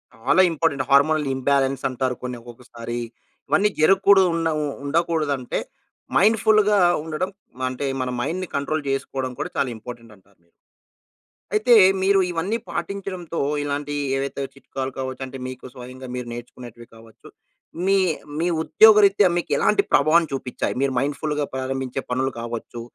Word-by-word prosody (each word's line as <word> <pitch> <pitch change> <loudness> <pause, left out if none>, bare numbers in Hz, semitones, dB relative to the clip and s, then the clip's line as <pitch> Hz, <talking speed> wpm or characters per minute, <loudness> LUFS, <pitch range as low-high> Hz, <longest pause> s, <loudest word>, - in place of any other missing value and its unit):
చాలా 125 +10 +3
important. 145 -5 0
Hormonal 150 +2 +4
imbalance 135 0 0
అంటారు. 130 0 -2
కొన్ని 125 -1 -4
ఒక్కొక్కసారి 120 0 -8 0.5
ఇవన్నీ 200 +1 +3
జరగకూడదు 195 +3 +5
ఉండ 165 -1 0 0.4
ఉండకూడదు 160 0 0
అంటే 125 - -3 0.6
మైండ్‌ఫుల్‌గా 210 0 +4 0.3
ఉండడం 160 +3 -3 0.4
అంటే 130 +2 -4 0.2
మన 130 - -2
మైండ్‌ని 170 +8 -2
కంట్రోల్ 145 +2 -1
చేసుకోవడం 135 -1 -3
కూడా - - -3
చాలా 135 - +1
ఇంపార్టెంట్ 115 -1 -10
అంటారు. 100 0 -28 1.2
అయితే 215 +3 +4 0.3
మీరు 195 0 +4
ఇవన్నీ 180 +7 -1
పాటించడంతో 185 -4 -5 0.3
ఇలాంటి 145 0 -3 0.2
ఏవైతే 140 +1 -3
చిట్కాలు 135 -1 -6
కావచ్చు, 130 0 -5
అంటే 130 0 -9
మీకు 130 -1 -9
స్వయంగా 130 0 -10
మీరు 125 -1 -5
నేర్చుకునేటివి 120 -1 -10
కావచ్చు. 115 -1 -17 0.6
మీ 195 0 +4 0.4
మీ 170 - +1 0.2
ఉద్యోగరీత్యా 205 0 +6
మీకు 175 - -3
ఎలాంటి 210 -1 +3
ప్రభావం 160 +4 +4
చూపించాయి, 130 -2 -3
మీరు 135 -1 +1
మైండ్‌ఫుల్‌గా 145 +1 -2
ప్రారంభించే 130 -1 -3
పనులు 130 +1 0
కావచ్చు, 115 0 -6
140 Hz, 130 wpm, -22 LUFS, 130-170 Hz, 1.2 s, ఉద్యోగరీత్యా